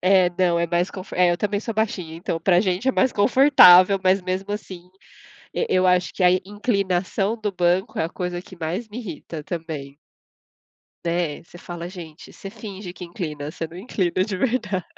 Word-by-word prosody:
é. 185 -1 +4
Não, 175 -2 +2
é 170 - +1
mais 175 +2 0
conf 185 -1 -9
é, 180 -1 +3
eu 175 - +1
também 205 +1 -1
sou 230 - -4
baixinha, 190 -7 -2
então 165 -1 -3
pra 175 +1 +4
gente 190 +5 0
é - - +3
mais 260 0 +2
confortável, 205 -5 +7
mas, 185 +1 +3
mesmo 185 +2 -3
assim, 185 -4 -8 0.6
e 475 - 0
eu 185 0 +3
acho 180 0 +2
que 185 - -1
a 180 - +6
inclinação 195 +1 -1
do 210 -1 -2
banco 185 +4 0
é - - +2
a 165 - -5
coisa 180 -1 -4
que 185 - -14
mais 175 +8 -4
me 210 - -8
irrita 165 -7 -7
também. 155 -5 -6 1.1
Né, 170 -3 -1
você 175 +1 -15
fala: 175 -1 -7
"Gente" 170 -4 -11
você 195 - -9
finge 200 -3 -8
que 180 - -8
inclina, 155 -5 -5
você 165 - -5
não 165 +2 -13
inclina 185 -3 -1
de 200 -3 -4
verdade. 210 -6 -1
185 Hz, 190 wpm, -23 LUFS, 175-200 Hz, 1.1 s, confortável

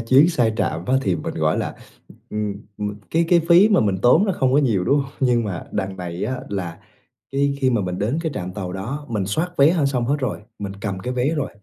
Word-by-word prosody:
chuyến, 130 +8 +5
sai 120 -9 +2
trạm 85 -4 -1
á, 130 - +2
thì 95 -7 +1
mình, 80 - -5
gọi - - +1
là, - - -3 0.6
ừm, 105 -1 -2 0.2
ừm, 105 - -1
m 105 0 -8
cái 165 +1 +2
cái 175 -1 +5
phí 180 +5 +7
mà 205 -4 +4
mình 100 -4 +1
tốn 125 +10 +6
nó 195 - +1
không 130 -6 +1
có 140 - +5
nhiều, 115 -10 +2
đúng 140 +7 +3
không? 135 0 -11
Nhưng 120 -3 +2
mà 95 -5 -4
đằng 95 -2 -2
này 90 -1 -4
á 130 0 -3
là 90 -4 -4 0.5
cái 140 +1 +1
khi 130 -1 +3
mà 120 -4 +1
mình 90 -1 -3
đến 115 +9 0
cái 160 -2 -2
trạm 90 -3 -4
tàu 90 -3 -5
đó 125 +11 -5
mình 105 -4 -1
soát 160 - -1
vé 140 +3 +6
h 165 -5 +1
xong 130 -3 0
hết 140 +4 +2
rồi, 130 -5 -2 0.2
mình 100 -2 -4
cầm 95 -3 -3
cái 125 +6 -4
vé 125 +2 +1
rồi, 145 -3 -2
120 Hz, 260 wpm, -22 LUFS, 100-140 Hz, 0.6 s, phí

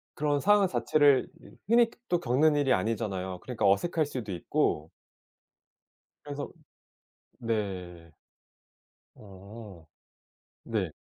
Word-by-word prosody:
그런 145 -1 0
상황 205 -1 +4
자체를 145 -6 +3
이 - - -15 0.2
흔히 235 0 +5 0.2
또 175 - +2
겪는 150 +2 +3
일이 140 -3 +3
아니잖아요. 95 -4 -2
그러니까 120 -6 0
어색할 155 - +2
수도 125 -8 -6
있고 80 -2 -1 1.4
그래서 145 0 -5 0.9
네. 90 -7 -4 1.0
어. 100 -2 -12 0.8
네. - - -2
115 Hz, 200 characters per minute, -28 LUFS, 95-145 Hz, 1.4 s, 흔히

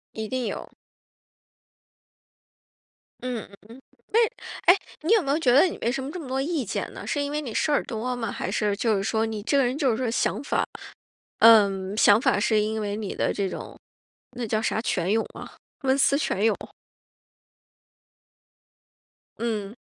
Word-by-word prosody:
一 220 -1 -4
定 255 -2 -2
有。 - - -5 2.5
嗯。 250 -3 -4 0.7
哎， - - +7 0.5
哎， - - -1 0.2
你 320 - -1
有 450 -2 +6
没 275 - -5
有 290 - +3
觉 260 -7 +2
得 270 - +7
你 365 - -1
为 235 - +1
什 270 +1 -3
么 275 - -5
这 360 - -6
么 305 - -8
多 265 +1 -1
意 305 -1 -1
见 195 - -4
呢？ - - -8
是 290 - -1
因 285 - -2
为 300 - -1
你 245 -7 -6
事 - - 0
儿 290 - +2
多 245 +3 -3
吗？ 230 -2 -3
还 - - -4
是 210 -2 0
就 225 -1 +1
是 195 - -1
说 220 +1 0
你 220 -2 -5
这 280 - +1
个 270 - +4
人 255 +3 -1
就 275 -5 +2
是 220 - -1
说 250 -2 -1
想 235 - 0
法 - - 0 0.8
嗯， 200 -3 +5
想 215 0 +6
法 205 - +2
是 215 +1 +2
因 220 +1 -1
为 205 -1 -2
你 210 -2 -4
的 - - 0
这 195 -2 -1
种， - - -8 0.6
那 245 -2 -4
叫 215 0 0
啥， 220 - 0
泉 185 -5 -1
涌 225 +1 +1
啊， - - -10 0.3
文 265 +1 +2
思 275 +1 +4
泉 210 -8 -1
涌。 220 -2 +3 2.8
嗯。 220 -2 -3
230 Hz, 195 characters per minute, -25 LUFS, 215-270 Hz, 2.8 s, 哎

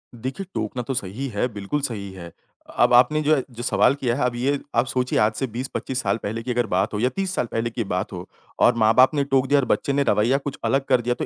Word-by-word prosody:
देखिए, 130 - -5
टोकना 110 +3 -3
तो 135 - -3
सही 120 +4 -4
है, 110 +2 -1
बिल्कुल 105 +9 -3
सही 105 -8 -4
है 85 -3 -10 0.4
अ, - - -10
अब - - +5
आपने 125 +5 +5
जो 155 +1 +4
है 135 - -1
जो 120 0 -8
सवाल 130 +2 +3
किया 125 -4 -1
है 135 - -1
अब 125 -1 -1
ये 140 +4 0 0.2
आप 120 +2 +3
सोचिए 125 -1 0
आज 105 +1 +3
से 135 - -2
20-25 130 +2 -4
साल 100 -1 0
पहले 110 +3 -3
की 125 - -3
अगर 120 0 +1
बात 95 +3 0
हो 105 - -2
या 125 - +2
30 190 +7 -3
साल - - 0
पहले 115 +1 -1
की 115 0 -3
बात 90 -1 -3
हो 90 0 -7 0.3
और 120 - +5
माँ-बाप 115 +5 +5
ने 140 - +2
टोक 135 -1 +1
दिया 145 +1 +4
और 135 - 0
बच्चे 140 - 0
ने 140 0 +2
रवैया 120 +6 +3
कुछ 140 -1 -6
अलग 135 0 +1
कर 130 -2 +4
दिया, 120 +1 0
तो - - -3
125 Hz, 270 wpm, -23 LUFS, 110-135 Hz, 0.4 s, अब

